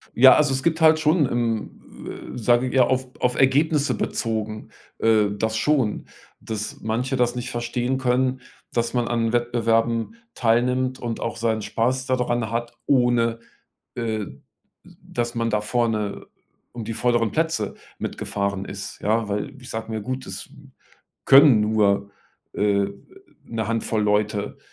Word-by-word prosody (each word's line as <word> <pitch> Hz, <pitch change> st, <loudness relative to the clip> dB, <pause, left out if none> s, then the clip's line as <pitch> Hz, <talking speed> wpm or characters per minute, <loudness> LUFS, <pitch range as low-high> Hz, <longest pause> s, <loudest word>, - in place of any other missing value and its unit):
Ja, 130 Hz, +2 st, +8 dB
also 145 Hz, -3 st, +3 dB
es 130 Hz, 0 st, -2 dB
gibt 165 Hz, 0 st, +1 dB
halt 160 Hz, 0 st, +6 dB
schon 155 Hz, 0 st, +3 dB
im, 115 Hz, -3 st, -4 dB
äh, -, -, -6 dB
sage 120 Hz, +2 st, +2 dB
ich -, -, -5 dB
ja, 130 Hz, -, +6 dB
auf 130 Hz, +1 st, 0 dB
auf 125 Hz, 0 st, +1 dB
Ergebnisse 145 Hz, +2 st, +3 dB
bezogen, 110 Hz, -2 st, -3 dB, 0.3 s
äh, 110 Hz, -2 st, +4 dB
das 110 Hz, +2 st, -1 dB
schon 130 Hz, -3 st, +1 dB, 0.4 s
dass 110 Hz, -1 st, -5 dB
manche 125 Hz, +4 st, -2 dB
das 120 Hz, 0 st, +1 dB
nicht 125 Hz, 0 st, -4 dB
verstehen 120 Hz, +2 st, -1 dB
können, 130 Hz, 0 st, +1 dB, 0.3 s
dass 120 Hz, 0 st, -1 dB
man 120 Hz, -1 st, 0 dB
an 115 Hz, -1 st, 0 dB
Wettbewerben 115 Hz, -, +1 dB, 0.2 s
teilnimmt 125 Hz, +2 st, +1 dB
und 115 Hz, -2 st, -4 dB
auch 115 Hz, -, -3 dB
seinen 110 Hz, -1 st, 0 dB
Spaß 130 Hz, +5 st, -1 dB
da 130 Hz, -, +1 dB
dran 120 Hz, -2 st, -1 dB
hat, 120 Hz, +1 st, -4 dB
ohne, 120 Hz, -3 st, +2 dB, 0.6 s
äh, 110 Hz, -3 st, -2 dB, 0.6 s
dass 120 Hz, 0 st, -5 dB
man 115 Hz, 0 st, 0 dB
da 105 Hz, -, +1 dB
vorne 105 Hz, -2 st, -1 dB, 0.4 s
um 115 Hz, -3 st, -7 dB
die 115 Hz, -, -4 dB
vorderen 120 Hz, -1 st, +1 dB
Plätze 160 Hz, -10 st, 0 dB, 0.2 s
mitgefahren 100 Hz, -1 st, -3 dB
ist, 100 Hz, +1 st, -7 dB
ja. 110 Hz, +1 st, +1 dB
Weil 105 Hz, +7 st, -3 dB
ich 125 Hz, -, -11 dB
sage 115 Hz, 0 st, -5 dB
mir: 110 Hz, -, -2 dB
„Gut, 130 Hz, +3 st, -4 dB
das 95 Hz, -, -7 dB, 0.8 s
können 135 Hz, -5 st, +7 dB
nur, 100 Hz, -2 st, +2 dB, 0.4 s
äh, 100 Hz, -1 st, +1 dB, 0.6 s
'ne 110 Hz, -2 st, -3 dB
Handvoll 115 Hz, -1 st, 0 dB
Leute, 105 Hz, 0 st, 0 dB
115 Hz, 150 wpm, -23 LUFS, 110-130 Hz, 0.8 s, Ja